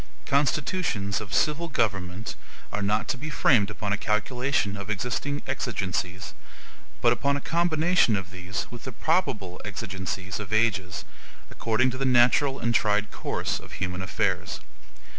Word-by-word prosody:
Constitutions 140 - +1
of 105 -2 -8
civil 155 +7 +2
government 100 - -1 0.4
are 105 - -1
not 105 +2 +1
to 130 - -1
be 155 +3 -5
framed 115 -8 +4
upon 105 0 -2
a - - +1
calculation 110 0 0
of 100 0 -7
existing 125 +7 -2
exigencies, 95 -7 -2 0.7
but 120 0 +5
upon 140 +4 +1
a - - -2
combination 170 -5 +3
of 95 -2 -4
these 90 +1 -4
with 120 -1 -9
the 130 - -4
probable 110 - 0
exigencies 95 -2 -4
of 105 -2 -6
ages, 105 -5 +1 0.5
according 120 +3 +1
to 130 - -6
the - - 0
natural 130 +2 +5
and 115 -2 0
tried 105 -1 +2
course - - -2
of - - -12
human 90 -1 -3
affairs. 95 - -1
110 Hz, 145 wpm, -27 LUFS, 100-135 Hz, 0.7 s, but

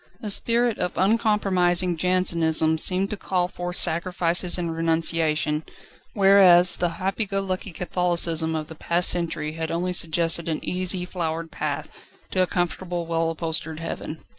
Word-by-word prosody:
A 210 - -2
spirit 235 +2 +2
of 180 - -3
uncompromising 185 -4 +2
Jansenism 165 -3 +1
seemed 185 +4 +2
to 210 - -4
call 180 -2 -1
forth 175 0 -6
sacrifices 175 +1 +2
and 170 -2 -3
renunciation, 160 -2 0 0.5
whereas 195 -3 +5
the 175 -1 -2
happy 195 +3 -2
go 195 0 -1
lucky 190 0 -4
Catholicism 170 -2 0
of 155 -1 -3
the 160 - -11
past 170 +3 0
century 160 -3 -2
had 160 0 -5
only 180 +2 -2
suggested 170 0 0
an 155 - -3
easy, 180 0 0
flowered 165 -2 -4
path, - - -5 0.3
to 185 - +1
a 185 - +2
comfortable, 175 0 -3
well 165 0 -1
upholstered 160 -1 -3
heaven. 165 -1 -6
175 Hz, 145 wpm, -23 LUFS, 165-185 Hz, 0.5 s, whereas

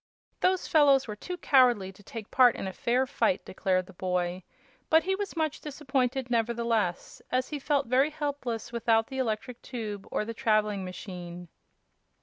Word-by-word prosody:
"Those 370 0 +1
fellows 280 -4 +5
were 210 - -5
too 360 - -6
cowardly 245 - +4
to 195 - -18
take 215 +1 -9
part 250 -2 +6
in - - -5
a 190 - -4
fair 245 +7 +1
fight," 275 +2 0
declared 185 -1 0
the 190 - -14
boy; 180 0 -1 0.5
but 320 +1 +5
he 385 - 0
was 395 -1 -3
much 315 -1 -1
disappointed, 270 -3 -1
nevertheless, 230 -5 0
as 255 0 0
he 295 - -4
felt 285 0 +1
very 260 +5 +3
helpless 285 -7 -4
without 225 -1 +2
the 265 -1 -4
electric 235 0 -2
tube 215 -5 -6
or 210 - -1
the 230 - -5
traveling 215 -3 +1
machine. 180 -2 -8
235 Hz, 165 wpm, -28 LUFS, 205-275 Hz, 0.5 s, part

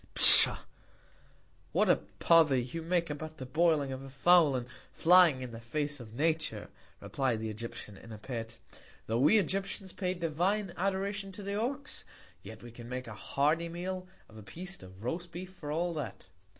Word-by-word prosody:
Pshaw! - - +11 1.2
What - - +2
a - - +4
Pother 160 -5 +2
you 125 +7 -4
make 170 -1 -1
about 155 +1 -8
the 130 - -8
boiling 155 0 0
of 130 0 -7
a 135 - -11
Fowl, 155 +1 +3
and 125 -1 -4 0.3
flying 170 -6 +4
in 125 - -8
the 115 - -9
Face 145 +5 -4
of 115 -2 -12
Nature, 155 -7 -2 0.3
replied 130 -5 -2
the 110 0 -5
Egyptian 105 -2 -9
in 115 - -14
a 110 - -8
Pet; 115 0 -8 0.5
tho' 115 +1 -2
we 150 - +4
Egyptians 195 0 -3
pay 185 -2 -3
divine 175 +4 -2
Adoration 195 +1 -3
to 205 +1 -9
the 200 +1 -5
Ox; 265 +7 -4 0.4
yet 110 +1 -12
we 120 - -11
can 120 0 -12
make 125 0 -5
a 115 - -9
hearty 150 +9 -1
Meal 185 +2 -6 0.2
of 110 - -17
a - - -10
Piece 175 - -8
of 95 +2 -14
roast 170 +7 -5
Beef 180 +2 -9
for 150 -6 -8
all 170 +3 -2
that. 125 - -8
155 Hz, 180 wpm, -30 LUFS, 120-180 Hz, 1.2 s, Pshaw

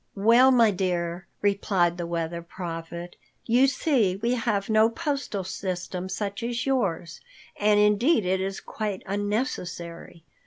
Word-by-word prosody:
"Well, 230 +6 +6
my 235 -4 +5
dear," 175 -2 -2 0.2
replied 190 -3 +1
the 170 - -3
Weather 170 0 -3
Prophet, 170 0 -7 0.3
"you 245 +4 +4
see 260 - +1
we 230 +5 -1
have 215 -5 -1
no 220 0 +4
postal 275 - -3
system 185 0 -4
such 200 +2 -3
as 235 +1 -2
yours, 180 - -1 0.3
and 210 0 +3
indeed 210 - +3
it 185 +1 +1
is 195 0 -3
quite 210 -4 -4
unnecessary. 190 - -4
200 Hz, 130 wpm, -26 LUFS, 175-230 Hz, 0.3 s, Well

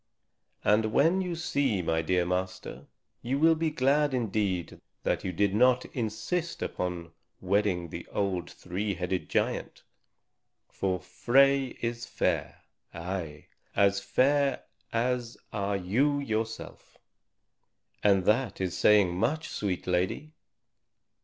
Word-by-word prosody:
"And 110 +1 +3
when 165 +9 +4
you 180 -2 -3
see 140 - 0
my 80 0 +1
dear 90 +2 +1
master, 90 +1 -4 0.3
you 130 +3 -1
will 165 +3 +5
be 160 0 0
glad 145 0 +2
indeed 100 -7 -1 0.2
that - - 0
you 95 - -2
did 100 +2 +1
not 125 +3 +4
insist 130 +9 -2
upon 85 -2 -4 0.3
wedding 95 -3 0
the - - -7
old 95 -4 -2
three 100 +3 -4
headed 90 +1 -3
giant. - - -1 0.8
For 95 -2 -2
Frey 135 +7 +2
is 120 0 -3
fair, - - -1 0.3
ay, 85 -3 -5 0.3
as 100 0 +4
fair 135 +8 +2 0.3
as 120 0 -1 0.2
are 100 -1 -1
you 125 +11 +1
yourself. 110 -4 -4 1.1
And 95 -3 +4
that 115 -1 +1
is 95 -2 -2
saying 100 -4 +4
much, 155 - -1
sweet 95 -4 -3
lady." 90 +12 -1
105 Hz, 120 wpm, -29 LUFS, 90-130 Hz, 1.1 s, will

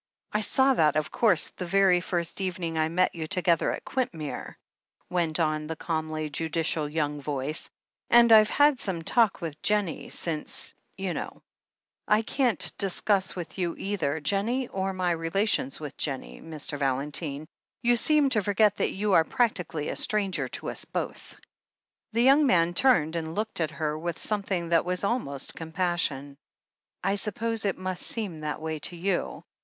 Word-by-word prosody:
"I 210 - +1
saw 265 +5 +4
that, 155 - +3
of 155 0 -1
course, 205 -9 +3
the 180 - -6
very 190 -1 +4
first 175 0 -2
evening 175 -3 -2
I 160 0 +1
met 180 +3 +2
you 160 -2 -5
together 175 -2 +2
at - - -6
Quintmere," 170 - -4 0.6
went 170 -2 +1
on 155 -1 0
the 160 - -4
calmly 155 -1 -3
judicial 160 0 0
young 150 -1 -2
voice. 140 +2 -1 0.4
"And 235 -1 +6
Fve 215 -1 +8
had 290 -2 +4
some 180 -6 -3
talk 225 +3 +3
with 155 -3 -6
Jennie 205 -5 0
since, 160 -3 -3 0.2
you 190 -2 -2
know." - - -6 0.6
"I 210 +1 +3
can't 245 0 +2
discuss 195 0 +1
with 175 +1 -7
you 175 -2 -1
either 165 -7 -2
Jennie 215 - 0
or 190 0 -2
my 185 -2 0
rela 165 +6 0
tions 135 -9 +1
with 150 -3 -7
Jennie, 135 -4 -3
Mr. 155 -2 -5
Valentine. 140 +2 -2 0.4
You 240 0 +4
seem 295 +3 +3
to 215 - +3
forget 205 +1 +2
that - - 0
you 205 +1 0
are 165 - +6
practically 175 -8 -1
a - - -3
stranger 200 -3 0
to - - -5
us - - -5
both." - - -5 0.7
The 230 +1 +2
young 275 +3 +6
man 175 -6 +3
turned 175 - +3
and 160 -1 -4
looked 215 -3 -2
at 160 - +1
her 155 0 -3
with 170 +1 -3
some 210 -1 -1
thing 180 -4 -3
that 165 -1 +3
was 180 +1 -2
almost 200 - -1
compassion. 160 -5 -2 0.7
"I 195 +1 +1
suppose 225 +2 -1
it 195 - 0
must 185 -1 -3
seem 200 -9 -2
that 150 -1 -4
way 160 0 -4
to 175 - -10
you. 180 +1 -2
175 Hz, 170 wpm, -27 LUFS, 155-205 Hz, 0.7 s, Fve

